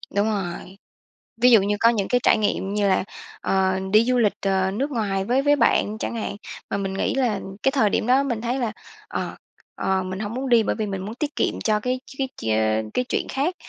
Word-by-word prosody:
Đúng 205 +1 +3
rồi, 190 -2 -4 0.6
ví 250 +1 +7
dụ 225 -4 +7
như 205 +1 0
có 230 - +6
những 210 -5 0
cái 245 - +2
trải - - +5
nghiệm 200 -2 -1
như 205 -1 +1
là, 190 - +2 0.4
ờ, 190 -1 +1
đi 215 +1 +7
du 250 0 +2
lịch, 220 -4 +3
ờ, 190 -1 +1
nước 270 +9 -2
ngoài 200 -6 -1
với 250 +5 +2
với 290 +1 +4
bạn 230 -4 +2
chẳng 225 - -4
hạn, 215 -2 -3 0.3
mà - - -1
mình 195 -1 -3
nghĩ 195 - -1
là 240 -7 +1 0.2
cái 270 - +4
thời 265 -7 +3
điểm 215 - 0
đó 260 +2 +4
mình 240 -5 -2
thấy 245 +3 -1
là, 235 -4 -1 0.4
ờ, - - -4 0.4
ờ, 190 -1 0
mình 185 +1 -5
hông 210 +1 -4
muốn 260 +1 -3
đi 235 -2 +5
bởi - - -1
vì 215 - -2
mình 195 -2 -4
muốn 215 +3 -6
tiết 300 +3 -3
kiệm - - 0
cho 215 -1 +2
cái 250 +3 -2 0.2
cái 265 -1 -1
chuyên 110 0 0
cái 250 - 0
chuyện - - -1
khác. 295 +7 -1
215 Hz, 235 wpm, -23 LUFS, 195-250 Hz, 0.6 s, ví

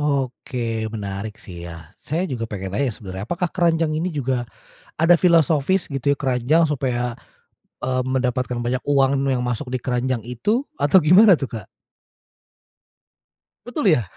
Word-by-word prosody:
Oke 125 -5 -2
menarik 100 0 -5
sih 85 -2 -10
ya. 85 0 -11
Saya 165 +5 -2
juga 115 -3 -3
pengen 95 -3 -5
nanya 135 +7 0
sebenarnya, 95 -1 -7
apakah 175 0 -1
keranjang 165 -3 +2
ini 160 +4 -1
juga 130 -6 -2 0.5
ada 165 +2 +6
filosofis 170 0 +3
gitu 140 0 0
ya, - - +2
keranjang 135 +5 +2
supaya, 125 -4 -1 0.7
eee, 130 0 0
mendapatkan 125 -1 -1
banyak 125 +2 -2
uang 135 -2 +3
nu 135 - +2
yang 125 - -1
masuk 125 +1 -3
di 130 - 0
keranjang 125 -1 -1
itu, 125 - -1 0.2
atau 145 +6 +4
gimana 190 +7 +7
tuh, 140 -6 -1
Kak? 110 - -11 2.0
Betul 245 -3 -2
ya? 120 - 0
130 Hz, 150 wpm, -22 LUFS, 120-155 Hz, 2.0 s, gimana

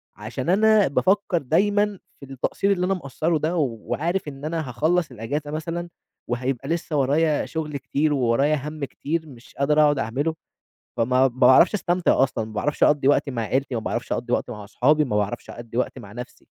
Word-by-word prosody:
عشان 120 +8 -5
أنا 215 +1 +5
بافكّر 190 +5 +1
دايمًا 205 +7 +1 0.2
في - - -10
التقصير 165 +9 -1
اللي 180 -2 +1
أنا 190 - +1
مقصّرُه 160 -1 -1
ده 155 +4 -1
وعارف 155 - -2
إن 140 0 -7
أنا 160 -3 -3
هاخلّص 155 +5 0
الأجازة 140 +6 -4
مثلًا، 165 +3 -4 0.4
وهيبقى 130 +2 -2
لسه 165 -1 -2
ورايا 145 +3 +2
شغل 155 -3 -4
كتير، 145 +3 0
وورايا 135 +3 +2
هَمّ 150 -1 -4
كتير 160 +4 -4
مش 125 -4 -15
قادر 150 +2 +3
أقعد 145 -2 +3
أعمله، 140 +8 -1 0.6
فما 115 - +2 0.2
ما 135 - +6
باعرفش 130 - +5
أستمتع 175 -7 +2
أصلًا، 115 -4 -1
ما 110 - -10
باعرفش 145 +8 0
أقضّي 145 -2 +3
وقت 145 0 +3
مع 125 -4 -3
عيلتي، 130 +4 -1
ما 115 - -2
باعرفش 120 +2 -4
أقضّي 120 +1 -2
وقت - - 0
مع 105 -3 -7
أصحابي، 140 +9 +2
ما 105 - -2
باعرفش 105 +3 -3
أقضّي 120 0 -8
وقت 125 - -1
مع 100 - -11
نَفْسي. 125 +3 -10
145 Hz, 185 wpm, -23 LUFS, 125-165 Hz, 0.6 s, ما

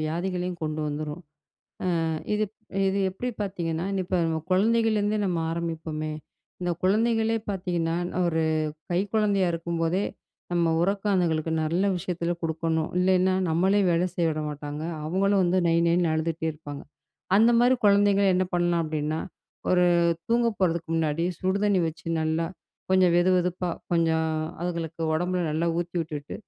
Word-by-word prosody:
வியாதிகளையும் 175 +2 -2
கொண்டு 155 0 -2
வந்துரும். 150 +3 -4 0.8
அ - - 0 0.3
இது 215 0 +1 0.4
இது 195 +1 0
எப்பிடி 245 +7 -4
பார்த்தீங்கன்னா, 175 -3 -2
நீ - - 0
இப்ப 185 0 0
நம்ம 160 -1 -1
குழந்தைகள்லேருந்தே 215 +1 +2
நம்ம 175 -3 0
ஆரம்பிப்பமே! 160 -2 -3 0.5
இந்த 175 0 0
குழந்தைகளே 225 +3 +2
பார்த்தீங்கன்னா, 175 -4 -1 0.3
ஒரு 160 -1 +1 0.5
கை 175 - +2
குழந்தையா 205 -3 +2
இருக்கும்போதே, 165 +3 -1 0.5
நம்ம 170 -1 +2
உறக்கம் 200 +2 0
அதுங்களுக்கு 160 -2 0
நல்ல 170 +4 0
விஷயத்தில 175 -1 -2
கொடுக்கணும். 160 0 -1
இல்லேன்னா, 185 0 +3 0.2
நம்மளே 190 +5 +3
வேல 170 +2 +2
செய்ய 170 -2 +1
விட 155 0 -2
மாட்டாங்க. 150 +1 -6 0.2
அவுங்களும் 195 +3 +2
வந்து 180 +2 +2
நை, 165 - +3
நைன்னு 170 -1 +2
அழுதுட்டே 160 +1 -1
இருப்பாங்க. 145 -2 -9 0.5
அந்தமாரி 240 +3 +5
குழந்தைகள 200 0 +4
என்ன 185 - +2
பண்ணலாம் 175 -1 +2
அப்பிடின்னா, 155 0 -2 0.5
ஒரு 180 -1 +4 0.4
தூங்க 235 +1 +3
போறதுக்கு 170 -3 0
முன்னாடி 160 0 0 0.2
சுடுதண்ணி 195 0 +2
வச்சு 160 +1 -10 0.2
நல்லா 160 +1 0 0.5
கொஞ்சம் 185 -2 +5
வெதுவெதுப்பா, 180 0 +2 0.2
கொஞ்சம் 160 -1 +2 0.3
அதுகளுக்கு 170 -2 -3
உடம்பில 180 +2 0
நல்லா 160 +3 0
ஊத்தி 175 +1 -4
விட்டுட்டு, 150 -3 -6
175 Hz, 135 wpm, -26 LUFS, 160-190 Hz, 0.8 s, அந்தமாரி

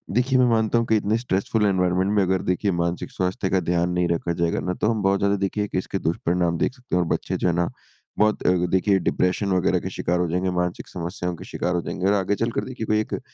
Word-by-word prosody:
देखिए, 130 +2 +3
मैं 125 - +5
मानता 110 0 +2
हूँ 115 - +1
कि 110 - +3
इतने 105 +2 +1
स्ट्रेसफुल 110 -1 0
एनवायरनमेंट 95 0 +2
में 100 - +4
अगर 95 0 +1
देखिए 100 +2 0
मानसिक 85 +1 -2
स्वास्थ्य 95 +1 -1
का 95 - +2
ध्यान 85 0 +1
नहीं 90 0 +1
रखा 85 0 -1
जाएगा 85 -1 +1
ना 90 - -2
तो - - +4
हम 110 - -1
बहुत 95 0 +2
ज़्यादा 100 0 +2
देखिए 105 +1 -1
कि 95 - -3
इसके 95 +1 -2
दुष्परिणाम 85 +1 0
देख 125 - 0
सकते 125 -8 -5
हैं 90 - +3
और - - -5
बच्चे - - -1
जो - - +4
है 85 - +2
ना 85 0 +1 0.5
बहुत 105 0 +3
अ, - - +6 0.2
देखिए 95 +1 +3
डिप्रेशन 95 +2 0
वग़ैरह 90 - +2
के - - -5
शिकार 90 +1 0
हो 90 - +1
जाएँगे 90 +2 0
मानसिक 90 0 -3
समस्याओं 90 0 -4
के - - -10
शिकार 90 +1 -1
हो 85 - 0
जाएँगे 90 +3 -2
और 100 - +4
आगे 100 0 +1
चलकर 115 0 -1
देखिए 125 -4 -5
कोई 110 0 +2
एक - - -6
अ, - - -5
95 Hz, 255 wpm, -23 LUFS, 90-105 Hz, 0.5 s, अ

